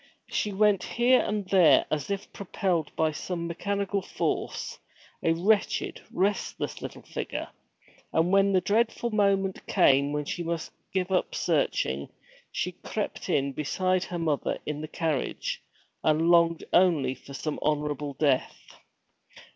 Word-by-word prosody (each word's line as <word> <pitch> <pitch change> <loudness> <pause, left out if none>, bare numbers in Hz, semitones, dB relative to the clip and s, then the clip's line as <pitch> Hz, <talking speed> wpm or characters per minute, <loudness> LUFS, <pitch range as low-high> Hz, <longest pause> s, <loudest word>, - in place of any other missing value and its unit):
She 210 - 0
went 205 -1 +3
here 245 +6 +3
and 210 -1 -1
there 175 -8 +6
as 150 +1 -1
if 200 0 -4
propelled 180 -5 -1
by 160 -1 +2
some 170 +2 -4
mechanical 200 +3 -1
force, - - -3 0.4
a 165 - +3
wretched, 200 +5 +1
restless 200 +3 -1
little - - -7
figure. - - -5 0.6
And 165 +2 +2
when 195 0 +4
the 185 -1 +3
dreadful 225 +4 +1
moment 195 -2 +1
came 140 -6 +4
when 150 0 -2
she 175 - -3
must 170 -1 -3 0.2
give 190 0 -1
up 185 - 0
searching, 70 +2 0 0.4
she - - -2
crept - - -5
in 140 0 +1
beside 185 +6 0
her 175 - -5
mother 160 -4 0
in 150 0 -3
the 155 - -5
carriage, 160 -4 -2 0.4
and 160 +2 +3
longed 170 -1 +4
only 165 -8 +4
for 140 +1 -12
some 155 +3 -3
honorable 145 -1 -1
death. 135 -3 +1
170 Hz, 140 wpm, -27 LUFS, 150-195 Hz, 0.6 s, there